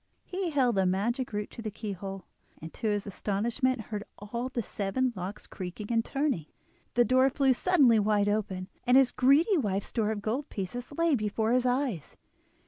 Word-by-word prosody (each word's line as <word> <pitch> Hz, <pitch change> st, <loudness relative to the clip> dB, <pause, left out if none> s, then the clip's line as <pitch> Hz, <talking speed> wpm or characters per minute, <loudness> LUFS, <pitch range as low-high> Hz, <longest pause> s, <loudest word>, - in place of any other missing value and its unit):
He 370 Hz, -1 st, -2 dB
held 265 Hz, -6 st, +2 dB
the 190 Hz, -1 st, +3 dB
magic 235 Hz, +8 st, 0 dB
root 210 Hz, -1 st, -3 dB
to -, -, -8 dB
the 220 Hz, -, -3 dB
keyhole, 195 Hz, -3 st, -6 dB, 0.3 s
and 160 Hz, +1 st, -9 dB
to 225 Hz, -, -3 dB
his 205 Hz, -1 st, 0 dB
astonishment 230 Hz, +6 st, -1 dB
heard 210 Hz, -1 st, -3 dB
all 235 Hz, +5 st, -4 dB
the 240 Hz, -3 st, -2 dB
seven 235 Hz, +6 st, -1 dB
locks 185 Hz, +2 st, -6 dB
creaking 190 Hz, +4 st, -7 dB
and 225 Hz, 0 st, +3 dB
turning, 270 Hz, -, -1 dB, 0.5 s
the 240 Hz, 0 st, +5 dB
door 260 Hz, +2 st, +4 dB
flew 270 Hz, -1 st, +3 dB
suddenly 265 Hz, -7 st, +4 dB
wide 205 Hz, -1 st, +2 dB
open, 200 Hz, -3 st, -1 dB, 0.2 s
and 250 Hz, +1 st, +6 dB
his 270 Hz, -2 st, +5 dB
greedy 285 Hz, -, +4 dB
wife's 200 Hz, -5 st, -1 dB
store 220 Hz, -3 st, 0 dB
of 210 Hz, -2 st, -3 dB
gold 255 Hz, +7 st, -2 dB
pieces 230 Hz, +7 st, -5 dB
lay 335 Hz, +1 st, +2 dB
before 220 Hz, -1 st, 0 dB
his 250 Hz, 0 st, +3 dB
eyes. 250 Hz, -, -1 dB
225 Hz, 180 wpm, -29 LUFS, 205-260 Hz, 0.5 s, and